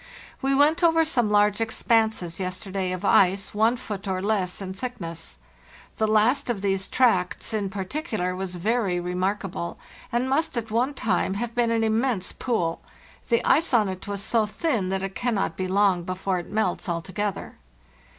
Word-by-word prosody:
We 270 0 +2
went 295 +5 +4
over 325 -1 +5
some 240 -8 +2
large 210 +1 +3
expanses 220 -6 +1
yesterday 190 0 -3
of 185 +2 -4
ice 195 +1 +3
one 220 +4 +3
foot 205 -3 -6
or 190 -1 -1
less 190 -2 0
in 190 -1 -5
thick 250 +5 -6
ness. 165 - -6 0.6
The 220 - +2
last 220 +5 +3
of 220 -5 -1
these 195 -1 0
tracts 225 -5 +1
in 205 -3 -1
particular 195 - -3
was 185 -1 -4
very 195 -1 0
remarkable, 180 0 -2 0.3
and 240 +1 0
must 310 +1 0
at 225 -2 -3
one 250 +6 +1
time 205 -4 0
have 235 +2 -3
been 240 -1 +2
an 230 -1 +1
immense 220 -2 0
pool; 175 -10 -1 0.5
the 235 -1 +2
ice 300 -3 +3
on 215 -3 +4
it 185 +1 -6
was 200 -1 -3
so 220 -1 +2
thin 210 - -1
that 190 0 -1
it 195 0 -4
cannot 235 -3 -1
be 185 - -2
long 190 -1 +3
before 185 +1 -2
it 175 - -9
melts 195 -4 -1
altogether. 185 +4 -3
205 Hz, 170 wpm, -25 LUFS, 185-235 Hz, 0.6 s, over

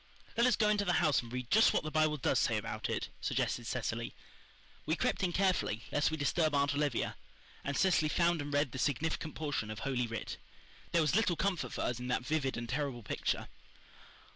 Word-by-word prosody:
"Let 235 +1 +4
us 250 - +4
go 215 - +2
into 210 -1 +2
the 180 -3 +1
house 155 -6 +3
and 115 -1 -11
read 125 -1 -5
just 220 +2 +6
what - - +1
the 155 - -4
Bible 155 -1 +2
does 130 - +2
say - - +2
about - - -4
it," - - -2
suggested - - -1
Cecily. - - -3 0.7
We 160 - +2
crept - - 0
in 185 -2 +1
carefully, 180 - +1
lest 145 - +2
we 160 - -3
disturb 155 +1 +1
Aunt 140 0 +2
Olivia, 145 -4 0 0.5
and 140 0 -2
Cecily 175 -5 +3
found 170 0 +2
and 145 0 -5
read 145 -2 +1
the 130 - -6
significant 155 +3 -1
portion 145 -8 -2
of 110 0 -6
Holy 130 -3 0
Writ. 115 -1 -5 0.5
There 170 -1 +3
was 150 +2 +1
little 205 -5 +3
comfort 190 +1 -1
for - - -3
us 120 - -1
in 125 - -5
that 125 0 -1
vivid 135 -3 0
and 120 0 -4
terrible 130 -2 -2
picture. - - -2
150 Hz, 210 wpm, -33 LUFS, 130-170 Hz, 0.7 s, just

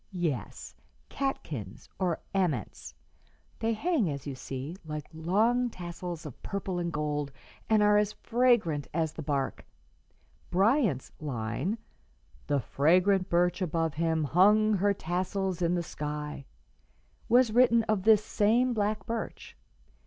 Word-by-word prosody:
"Yes, 160 - -3 0.4
catkins, 145 - -4
or 180 -4 0
aments. 140 - -2 0.6
They 225 +1 +1
hang, 265 - +1
as 140 -1 -5
you 140 - -4
see, 135 +4 -6
like 150 -2 -5
long 220 +10 +2
tassels 175 -3 -7
of 145 - -9
purple 195 -2 -3
and 170 -1 -2
gold, 150 -2 -2 0.4
and 215 -1 +4
are 210 0 +5
as 210 0 0
fragrant 230 - +1
as 160 -2 0
the - - -6
bark. 140 -2 -2 0.9
Bryant's 195 - +2
line, 135 - -2 0.7
"'The 145 -2 +1
fragrant 185 - +3
birch 175 +1 +2
above 165 -3 0
him 160 0 0
hung 210 +8 +4
her 200 +1 +2
tassels 185 +1 -2
in 175 +1 +2
the 175 - -1
sky,' 150 -2 -5 0.8
"was 245 0 +5
written 235 -1 +5
of 215 -3 0
this 215 +1 +5
same 235 +5 +2
black 210 -1 -1
birch. 230 -1 -5
180 Hz, 130 wpm, -29 LUFS, 150-215 Hz, 0.9 s, are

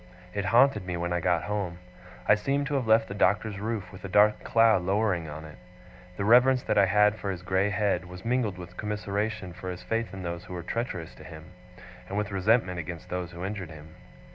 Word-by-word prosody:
It 100 0 -2
haunted 120 -1 +4
me 90 -1 -4
when 85 0 -2
I 85 - +1
got 85 -1 +1
home. 95 -2 -3 0.5
I - - +7
seemed 140 +7 0
to 145 - -3
have 130 -5 0
left 110 0 +4
the - - -6
Doctor's 100 +1 +1
roof 105 -3 -4
with 95 -1 -12
a 100 - -5
dark 105 +2 +4
cloud 115 -4 +4
lowering 95 -3 0
on 80 +1 -8
it. 75 -6 -12 0.6
The 100 - -1
reverence 125 +3 +5
that - - 0
I 100 -1 +5
had 105 +2 +4
for 100 - -3
his 90 -2 -4
grey 95 +2 +1
head, 105 -3 0
was 90 +2 -11
mingled 115 -5 0
with 90 0 -10
commiseration 105 -2 -3
for 95 +1 -7
his 90 0 -6
faith 115 0 -2
in 95 -2 -7
those 85 0 -5
who - - -9
were 85 - -5
treacherous 95 -6 -4
to - - -14
him, 80 +2 -11 0.6
and 100 - -3
with 105 0 -2
resentment 95 -2 +2
against 85 0 -7
those 90 -1 -3
who 85 +1 -6
injured 95 -4 -5
him. 80 0 -12
100 Hz, 220 wpm, -27 LUFS, 90-105 Hz, 0.6 s, I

